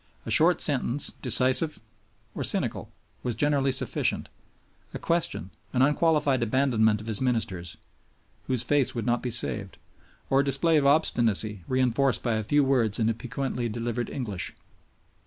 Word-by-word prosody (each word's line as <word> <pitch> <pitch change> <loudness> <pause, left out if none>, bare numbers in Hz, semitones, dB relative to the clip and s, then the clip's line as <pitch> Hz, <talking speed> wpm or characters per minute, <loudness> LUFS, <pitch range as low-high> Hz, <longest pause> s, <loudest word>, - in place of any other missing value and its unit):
A - - -5
short 175 +3 +4
sentence, 140 -1 +1
decisive 130 +5 +2 0.5
or - - -4
cynical, - - 0 0.3
was 120 -3 -3
generally 140 +1 +1
sufficient, 130 - -1 0.7
a - - -2
question, 165 - -2 0.2
an 130 0 +3
unqualified 150 -2 +2
abandonment 110 -3 +1
of - - -11
his 110 -1 -1
ministers, 105 -9 -2 0.7
whose 125 -2 +3
face 140 0 +1
would 115 - -3
not 120 0 0
be 125 - -3
saved, 110 -4 -1 0.5
or 135 - +2
a - - +3
display 160 +4 +2
of 140 -2 +2
obstinacy 115 - +1
reinforced 130 +1 +1
by 120 - 0
a 110 - -2
few 145 +7 +2
words 125 -6 +1
in 110 0 +2
a - - +1
piquantly 125 +1 -4
delivered 120 +1 -3
English. 105 -9 -5
125 Hz, 150 wpm, -26 LUFS, 115-140 Hz, 0.7 s, short